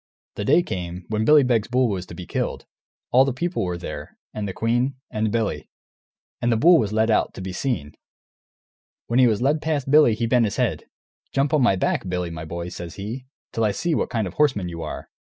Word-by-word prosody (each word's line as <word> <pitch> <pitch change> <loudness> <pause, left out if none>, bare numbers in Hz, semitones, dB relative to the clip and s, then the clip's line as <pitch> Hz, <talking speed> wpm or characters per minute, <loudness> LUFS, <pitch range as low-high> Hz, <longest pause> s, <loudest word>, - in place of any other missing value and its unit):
The 105 - -4
day 160 +8 +4
came, 90 - -5
when 110 0 0
Billy 150 +1 +7
Beg's 115 -4 +1
bull 125 +1 +2
was 95 -4 -3
to - - -9
be - - -8
killed; - - -3 0.5
all 130 +2 +6
the 135 - 0
people 175 - -1
were 90 -1 -2
there, 75 -4 -8 0.2
and 105 -1 -3
the - - -3
queen, 120 +6 0 0.2
and 110 0 -1
Billy. 115 -2 -2 0.7
And 120 - +2
the 115 - +3
bull 170 +7 +6
was 105 - -1
led 110 +1 +2
out, - - +1
to - - -8
be 95 0 -5
seen. 90 - -2 1.1
When 120 +2 +1
he 125 - +7
was 110 +1 +1
led 150 +3 +2
past 145 -4 -1
Billy 150 -7 +6
he 115 +1 -1
bent 120 0 +3
his 100 - -2
head. - - 0 0.5
"Jump 135 +1 +1
on 150 - +4
my 120 -6 +4
back, 95 0 -1
Billy, 90 -1 -2
my 80 -1 -6
boy," 85 +2 -5
says 85 -1 -8
he, 115 +6 -6 0.3
"till 115 - 0
I 110 - +3
see 165 - -1
what - - 0
kind 110 -3 -1
of 90 - -6
a - - -26
horseman 130 -12 +2
you 85 -1 -6
are!" 80 - -7
110 Hz, 230 wpm, -23 LUFS, 95-130 Hz, 1.1 s, Billy